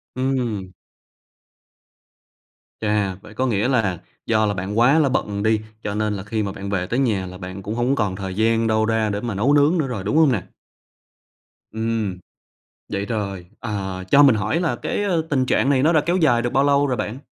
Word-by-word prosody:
Ừm. 120 -8 -2 2.1
Chà, 105 -3 0
vậy 105 - -13
có 130 +4 -1
nghĩa 110 -1 +1
là 110 -10 +1 0.3
do 110 -1 +2
là 105 - 0
bạn 100 +4 -3
quá 135 +7 +5
là 140 -3 +3
bận 105 -5 -1
đi, 110 0 +2 0.2
cho 100 0 -3
nên 105 -1 0
là 95 -1 -5
khi 110 0 -2
mà 100 - -3
bạn 100 0 -7
về 90 -2 -1
tới 125 - -1
nhà 105 -8 +1
là 90 0 -9
bạn 95 +2 -7
cũng 105 +3 -4
hông 125 +3 +1
còn 105 -5 -1
thời 95 -1 -5
gian 115 +1 +2
đâu 110 0 +2
ra 110 -1 +1
để 100 0 -2
mà 115 -5 -3
nấu 130 +9 +2
nướng 150 +4 +4
nữa 150 -4 0
rồi, 110 -7 -4
đúng 145 +10 0
hông 155 -4 +5
nè? 105 - 0 1.3
Ừm, 110 -4 -2 0.7
vậy 100 +1 -3
rồi, 100 -6 -4
ờ, 95 -4 -4
cho 145 - +7
mình 135 -5 +6
hỏi 110 - 0
là 175 - 0
cái, - - -2
ơ, 175 -5 +1
tình 130 -3 +1
trạng 135 - +2
này 130 -2 +3
nó 160 +3 +4
đã 155 - +4
kéo 175 +2 +2
dài 125 -9 +3
được 120 - -2
bao 135 +1 +3
lâu 145 0 +3
rồi 130 -2 -1
bạn? 115 +5 -4
110 Hz, 215 wpm, -22 LUFS, 100-130 Hz, 2.1 s, cho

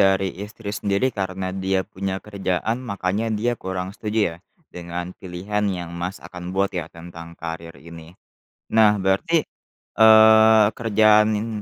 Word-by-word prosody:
dari 95 -1 +2
istri 105 0 -7
sendiri 105 +4 0
karena 95 -1 -4
dia 95 0 -1
punya 95 0 -4
kerjaan 100 +3 -2
makanya 100 -2 -2
dia 110 +3 0
kurang 95 -4 -5
setuju 105 +2 -4
ya, - - -11 0.4
dengan 90 +1 -6
pilihan 95 +3 -5
yang 90 -3 -4
Mas 90 +3 -4
akan 90 +1 -8
buat 100 0 +1
ya 85 -3 -4
tentang 85 0 -11
karir 85 0 -7
ini? 85 +2 -13 0.6
Nah 110 -2 +5
berarti, 105 - +1 0.6
eee, 110 0 +7
kerjaan 110 -1 +4
n 105 +2 -3
95 Hz, 140 wpm, -22 LUFS, 90-110 Hz, 0.6 s, eee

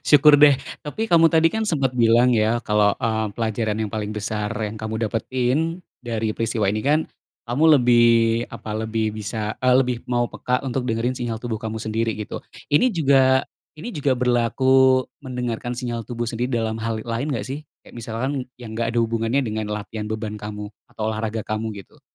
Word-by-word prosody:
Syukur 150 0 +7
deh, 145 -2 +7 0.2
tapi 150 +9 -4
kamu 170 -5 +5
tadi 165 +1 +4
kan 220 0 -1
sempet 135 -7 +1
bilang 120 +1 +4
ya 110 +1 +2
kalau, 105 -1 +3
eee, 110 -1 -1
pelajaran 110 -1 -1
yang 105 - -5
paling 105 -1 -3
besar 105 0 -2
yang 110 0 -3
kamu 110 +1 -2
dapetin, 130 - -1 0.2
dari 115 -2 -2
peristiwa 115 -1 -1
ini 105 +2 +1
kan, 150 +5 +2 0.4
kamu 150 +6 +4
lebih 120 -2 +5 0.4
apa 110 - -8
lebih 110 0 -1
bisa, 110 0 -4
eee, 130 0 +4
lebih 125 -2 +1
mau 120 -1 +1
peka 125 +2 -1
untuk 130 -1 -2
dengerin 115 +3 0
sinyal 120 -3 -3
tubuh 115 -1 -4
kamu 110 -1 -4
sendiri 110 0 -2
gitu. 105 - -6 0.3
Ini 245 +13 +5
juga 135 - +3 0.3
ini 235 +10 -7
juga 140 -5 0
berlaku 130 +2 +3 0.2
mendengarkan 125 -2 -4
sinyal 120 -2 -3
tubuh 120 -1 -3
sendiri 120 +2 -2
dalam 110 0 -2
hal 110 -1 -3
lain 120 +5 -2
enggak 115 - -2
sih? 135 +3 -4 0.3
Kayak - - -16
misalkan 115 +4 -3 0.3
yang 115 -3 -8
enggak 115 0 -1
ada - - +4
hubungannya 115 +3 0
dengan 110 -1 -3
latihan 105 0 -5
beban 110 -1 -4
kamu 105 0 -7 0.2
atau 110 - -8
olahraga 110 0 -3
kamu 110 +1 -3 0.2
gitu? - - -25
115 Hz, 180 wpm, -22 LUFS, 110-130 Hz, 0.4 s, Syukur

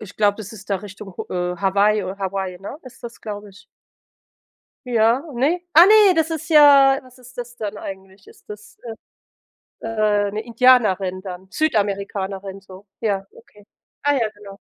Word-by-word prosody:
Ich 200 -3 -11
glaube, 205 -1 +2
das 215 -1 -9
ist 215 -1 -13
da 200 - +1
Richtung 200 -1 -11
H 180 0 -3
äh, - - -8
Hawaii 200 +3 +2
oder 190 +2 -6
Hawaii, 190 -2 -4
ne, 195 +9 -8
ist 255 -2 -15
das, 235 -1 -9
glaube 205 -1 -7
ich. 200 +1 -18 1.2
Ja, 235 +1 +2
ne? 295 +9 0
Ah, 335 +3 +8
ne, 420 -2 +6
das 320 -1 +1
ist 325 +1 -5
ja 280 -3 +7
was 255 -1 -18
ist 250 +1 -17
das 245 0 -7
dann 210 -2 -5
eigentlich? 190 0 -10
Ist - - -20
das, 210 0 -11 1.1
äh, - - -5
äh, 210 -2 +1
'ne 210 +2 -4
Indianerin 220 -6 +2
dann, 185 -1 -9
Südamerikanerin, 200 -6 -2
so? 190 +1 -14
Ja, 200 -3 -1
okay. 210 -3 -19 0.4
Ah 290 0 +2
ja, 230 -5 0
genau. 205 -2 -13
210 Hz, 170 wpm, -21 LUFS, 195-250 Hz, 1.2 s, Ah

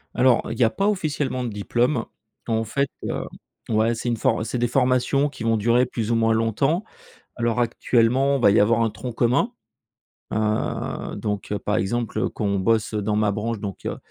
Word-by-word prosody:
Alors, 125 -1 +4
heu, - - -3
il 115 - -9
y - - +5
a 115 - +5
pas 195 - -1
officiellement 150 -9 -1
de 120 - -2
diplôme. 120 +4 0 0.4
En 115 -1 +1
fait, 140 +6 0 0.2
heu - - -2 0.5
ouais, 110 +1 +2
c'est 120 +2 -3
une 120 - 0
for 110 - +1
c'est 120 +3 -3
des 120 - +2
formations 130 +3 +2
qui 130 - -9
vont 115 0 +2
durer 120 +4 +3
plus 115 -2 -3
ou - - +3
moins 115 0 +3
longtemps. 125 - +1 0.5
Alors 120 0 0
actuellement, 120 +3 +2
il 135 - -3
va - - +7
y - - +4
avoir 115 +3 +3
un 115 - +1
tronc 120 +4 -6
commun. 125 - +1 0.8
Heu, 110 0 -2
donc 105 -2 -4
heu, 105 - 0
par 105 +1 -1
exemple, 115 +3 -1
quand - - -5
on 100 -1 +1
bosse 110 +3 +1
dans 105 0 0
ma 105 -1 +2
branche, 110 +2 -2
donc 100 -1 -6
heu, - - -2
115 Hz, 205 wpm, -23 LUFS, 110-125 Hz, 0.8 s, va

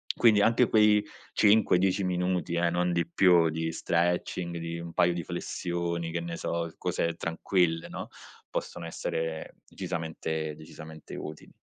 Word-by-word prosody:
Quindi 110 -3 +5
anche 115 +3 +4
quei 105 -1 +5 0.3
5-10 100 -2 +4
minuti, 90 -1 0
eh, 85 0 +2
non 90 0 +1
di 85 -1 0
più 85 -2 +5
di 80 +1 -2
stretching, 85 +1 -1
di 85 0 -4
un 85 0 -7
paio 90 -1 +3
di 85 -1 -3
flessioni, 85 -1 -3
che 85 - -1
ne 85 0 -5
so, 85 -1 -3
cose 85 0 -1
tranquille, 85 0 0
no, - - -6 0.4
possono 85 - -4
essere 80 -1 -4
decisamente 80 -1 -4
decisamente 80 0 -11
utili. 75 0 -8
85 Hz, 140 wpm, -28 LUFS, 80-90 Hz, 0.4 s, Quindi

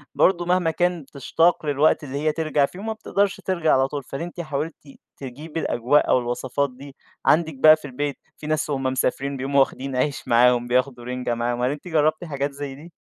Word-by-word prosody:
برضه 175 -2 +3
مهما 175 -2 +2
كان 175 +1 0
بتشتاق 155 +5 +1
للوقت 145 +1 +2
اللي 140 -1 -5
هي 155 +2 +1
ترجَع 155 -2 +1
فيه 180 - -11
وما 220 +2 -3
بتقدَرش 200 -2 -1
ترجَع 170 -4 +1
على 135 0 +3
طول، 145 0 -5
فهل 135 +4 -7
أنتِ 175 +1 -5
حاولتِ 155 0 -3 0.4
تجيبي 150 +5 -7
الأجواء 125 +4 +2
أو - - +4
الوصفات 125 +3 -2
دي 140 +2 -12 0.3
عندِك 160 -1 +3
بقى 155 +4 +7
في 155 - -13
البيت، 140 +2 -3 0.2
في 150 - -8
ناس 155 0 -1
وهُم 135 -2 -2
مسافرين 135 +1 -1
بيقوموا 140 +2 +1
واخدين 135 0 0
عيش 135 +2 -1
معاهم، 120 0 +4
بياخدوا 125 0 0
رِنجة 125 -1 -2
معاهم، 120 +1 -2
هل 125 +2 +1
أنتِ 150 +5 -7
جرّبتِ 155 0 +1
حاجات 140 -3 -3
زي 140 -1 -6
دي؟ 160 +5 -13
140 Hz, 200 wpm, -23 LUFS, 130-160 Hz, 0.4 s, بقى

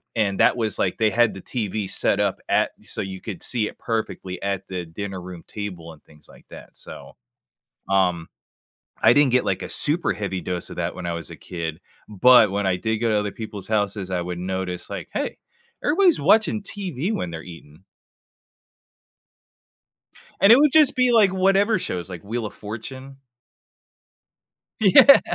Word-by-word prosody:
and 100 -4 0
that - - +4
was 110 -3 -2
like, 90 - 0
they 110 -1 +3
had 120 +1 +3
the 95 - -9
TV 105 -3 -3
set - - 0
up - - 0
at - - +2
so - - -5
you 95 -1 -6
could 105 - -7
see 115 -4 -1
it - - -10
perfectly, 110 -5 -4
at 100 -1 -3
the 90 -2 -5
dinner 95 +3 -6
room 90 -1 -10
table 90 -6 -7
and 75 - -20
things 75 -1 -21
like - - -19
that, - - -13
so, - - -11 0.8
um 90 -4 +1 0.7
I 110 - +7
didn't 140 -1 +4
get, 125 - +3
like, - - -1
a - - -5
super 155 +4 0
heavy 100 -3 -4
dose 90 -1 -4
of - - -9
that 85 0 -3
when 90 - -8
I 85 - -2
was 85 0 -6
a - - -9
kid, 80 -2 -6 0.3
but 110 +1 +6
when 100 0 -1
I 95 -1 +1
did 110 +4 -1
go 115 +1 0
to 110 - +2
other 105 0 -2
people's 105 -4 -8
houses, 100 -3 -1
I 90 -1 -1
would 90 0 -5
notice 90 0 -4
like, - - -6
"Hey, - - -3 0.5
everybody's 350 +2 +4
watching 220 -1 +3
TV 190 - -4
when 90 - -3
they're 80 -1 -7
eating." 85 -1 -14 2.6
And 200 +3 +7
it - - +9
would 295 -1 +4
just 310 -3 +5
be 250 -1 +3
like 215 -4 +5
whatever 195 +3 +2
shows, 90 - -4
like 90 -3 -8
Wheel 115 +2 -3
of - - -9
Fortune. 130 +6 -8 1.6
Yeah. 220 +7 +8
105 Hz, 180 wpm, -23 LUFS, 90-130 Hz, 2.6 s, it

